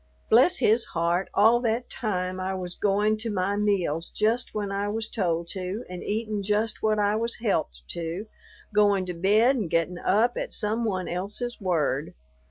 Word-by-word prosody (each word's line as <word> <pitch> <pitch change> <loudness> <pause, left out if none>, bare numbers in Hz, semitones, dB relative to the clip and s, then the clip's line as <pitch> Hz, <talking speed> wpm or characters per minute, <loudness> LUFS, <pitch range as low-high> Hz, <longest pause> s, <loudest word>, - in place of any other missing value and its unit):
Bless 255 +11 +6
his 225 +2 +3
heart, 170 +3 +1
all 225 +4 +5
that 235 0 -1
time 185 -5 -3
I 190 +1 -2
was 180 -1 -4
going 210 +2 +1
to 225 +1 -4
my 200 -1 0
meals 185 -6 0
just 225 +3 0
when 205 -2 -2
I 200 +1 -1
was 220 +1 -1
told 170 -6 -1
to 190 +4 -4
and 180 -1 -7
eatin' 215 -1 -2
just 210 +2 -1
what 215 -1 +2
I 205 0 +2
was 230 +1 -1
helped 65 - -1
to, 170 +4 -4 0.5
going 205 -2 +3
to 180 - -4
bed 215 +9 +3
and 205 -8 -2
getting 165 +2 0
up 230 +5 +2
at - - -3
some 220 +3 -1
one 185 -4 -1
else's 210 +7 -3
word! 155 -6 0
205 Hz, 175 wpm, -26 LUFS, 180-220 Hz, 0.5 s, Bless